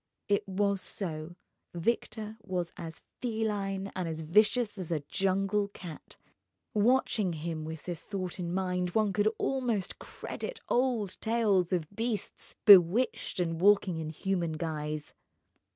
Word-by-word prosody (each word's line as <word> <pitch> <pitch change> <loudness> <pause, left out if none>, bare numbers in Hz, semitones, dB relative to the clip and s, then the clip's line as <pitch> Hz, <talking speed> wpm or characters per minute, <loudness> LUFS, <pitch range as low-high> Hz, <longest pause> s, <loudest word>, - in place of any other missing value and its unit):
It 200 -1 +1
was 200 0 +1
so: 165 -4 -4 0.4
Victor 220 +3 -2
was 180 -4 -3
as 165 -1 -8 0.2
feline 205 -4 -1
and 185 -2 -2
as 160 -1 -4
vicious 210 +6 +3
as 175 -2 -4
a 155 -3 0
jungle 195 +5 +1
cat. 180 -5 -10 0.6
Watching 215 -4 +2
him 160 0 -4
with 160 -1 -6
this 175 -2 -5
thought 185 -3 -4
in 170 -1 -2
mind, 180 -1 -1
one 215 -3 +3
could 210 +1 +3
almost 245 -8 -1
credit - - -6
old 240 -6 +1
tales 210 -6 +2
of 175 -4 0
beasts 225 -1 -3
bewitched 200 +3 +6
and 165 -2 -1
walking 195 -3 +4
in 155 -1 -4
human 170 0 -1
guise. 155 -1 -4
190 Hz, 135 wpm, -30 LUFS, 170-210 Hz, 0.6 s, bewitched